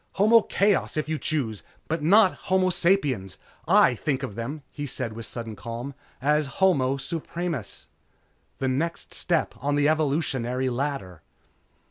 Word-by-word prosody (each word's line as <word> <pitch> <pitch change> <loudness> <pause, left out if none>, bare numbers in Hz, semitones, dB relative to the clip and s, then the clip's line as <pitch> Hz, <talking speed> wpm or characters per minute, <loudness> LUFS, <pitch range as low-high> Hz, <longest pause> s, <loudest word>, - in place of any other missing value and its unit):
Homo 225 +3 +5
chaos, 200 -5 +1
if 155 - -1
you 155 -1 -2
choose. 120 -10 -1 0.3
But 165 0 -2
not 190 +5 +5 0.2
homo 185 0 +3
sapiens. 140 - +1 0.3
I - - +6
think 135 +3 -2
of - - -4
them," 130 +7 -5
he 145 -1 -5
said 115 -3 -4
with 115 0 -7
sudden 115 -2 -6
calm, 115 +6 -6 0.3
"As 150 +2 +2
Homo 140 -9 +3
Supremus. 160 - -5 0.7
The 135 - -1
next 155 +6 -2
step - - 0
on 145 +1 0
the 145 0 +3
evolutionary 135 -5 0
ladder...." 120 - -3
145 Hz, 140 wpm, -25 LUFS, 125-165 Hz, 0.7 s, I